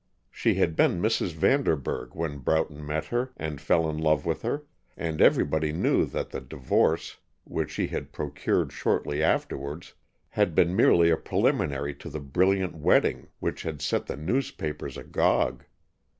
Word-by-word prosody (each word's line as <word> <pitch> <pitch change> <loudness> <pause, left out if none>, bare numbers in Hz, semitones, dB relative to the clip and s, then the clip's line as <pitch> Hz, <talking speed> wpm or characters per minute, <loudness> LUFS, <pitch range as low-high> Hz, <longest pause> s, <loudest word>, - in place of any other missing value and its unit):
She - - +1
had 80 - +1
been 85 - +3
Mrs. 110 -3 0
Vanderburg 80 - 0
when 80 -3 -3
Broughton 75 +2 0
met 75 +1 -2
her 125 +2 -2
and 75 -2 -5
fell 80 +2 +2
in 75 0 -3
love 75 -2 +2
with 80 -1 -1
her, 140 +6 -2 0.3
and 80 -2 -2
everybody 80 +1 +3
knew 80 - +2
that - - -4
the - - -5
divorce 65 -1 0 0.3
which - - -3
she - - -1
had - - -5
procured - - -1
shortly 75 +1 0
afterwards 75 0 -1 0.4
had 100 -6 +1
been 85 +2 +3
merely 85 -3 +5
a 80 - +3
preliminary 70 0 0
to 70 - -10
the 75 - -5
brilliant 95 +6 +1
wedding 80 - +2
which - - -3
had 80 -3 -5
set 75 - -1
the - - -4
newspapers 80 - -3
agog. - - 0
80 Hz, 155 wpm, -27 LUFS, 75-85 Hz, 0.4 s, merely